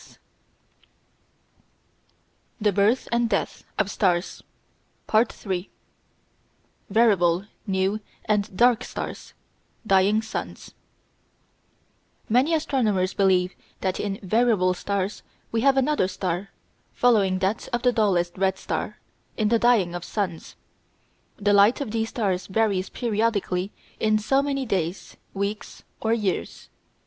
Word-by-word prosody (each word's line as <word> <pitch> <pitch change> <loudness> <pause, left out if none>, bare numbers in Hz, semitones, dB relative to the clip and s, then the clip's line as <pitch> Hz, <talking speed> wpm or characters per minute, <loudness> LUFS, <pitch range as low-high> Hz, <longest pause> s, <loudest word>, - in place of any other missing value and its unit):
] - - -20 2.3
THE 210 -1 +2
BIRTH 205 +6 +2
AND 235 0 +2
DEATH 200 - -2
OF 200 - 0
STARS 180 -4 0 0.7
§ 220 +2 +4
3 185 -2 -4 1.2
Variable, 195 -5 +3 0.2
New, 190 +2 0 0.3
and 205 -3 0
Dark 245 0 +4
Stars: - - -7 0.5
Dying 200 +2 +3
Suns 220 - -6 1.5
Many 260 +9 +3
astronomers 215 -12 0
believe 185 -2 +2 0.3
that 185 -1 -1
in 200 -1 -3
"variable 210 -2 +2
stars" 200 +1 -3 0.3
we 225 - 0
have 270 +1 +4
another 270 -7 +2
star, 185 0 -3 0.4
following 205 -6 +3
that 190 +3 -1
of 240 0 -1
the 250 - +4
dullest 180 -6 +1
red 190 0 +1
star, - - -4 0.4
in 215 -2 +1
the 230 0 +3
dying 220 -8 +3
of 175 -1 -5
suns. 185 -6 -4 0.8
The 205 0 +2
light 205 +4 +5
of 275 -7 -4
these 225 0 -1
stars 190 -6 -1
varies 200 -2 0
periodically 210 -5 -1 0.3
in 215 0 +3
so 270 +6 +2
many 275 -1 -2
days, 185 -4 -3 0.2
weeks, 200 +2 -4 0.2
or 225 - -1
years. 210 -5 -2
205 Hz, 115 wpm, -24 LUFS, 190-230 Hz, 2.3 s, light